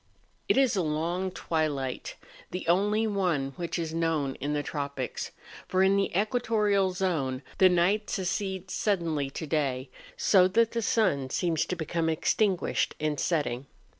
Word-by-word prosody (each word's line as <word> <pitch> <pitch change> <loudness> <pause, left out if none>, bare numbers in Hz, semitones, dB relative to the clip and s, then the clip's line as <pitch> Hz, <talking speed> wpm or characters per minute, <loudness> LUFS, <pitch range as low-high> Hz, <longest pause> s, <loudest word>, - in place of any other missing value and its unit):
It - - +4
is 265 -5 +4
a 190 - +2
long 170 +4 -1
twilight, 155 -7 -2 0.3
the 180 -2 -5
only 205 +5 +3
one 175 -10 0
which 170 0 -3
is 165 -2 -3
known 165 -4 0
in 145 +2 -1
the 145 0 -1
tropics; 140 -4 -4 0.4
for 185 0 +2
in 190 +1 +4
the 200 0 +2
equatorial 210 -3 +2
zone 160 -8 -1 0.2
the 185 - +7
night 185 +4 +2
succeeds 190 0 -2
suddenly 165 -9 0
to 160 - -6
day, 135 -4 -1 0.3
so 185 -3 +5
that 225 +4 +2
the 230 - -1
sun 185 - +1
seems 160 +1 0
to 180 - -2
become 165 0 -1
extinguished 185 +4 +1
in 155 -1 -1
setting. 140 -6 -1
175 Hz, 150 wpm, -28 LUFS, 150-195 Hz, 0.4 s, the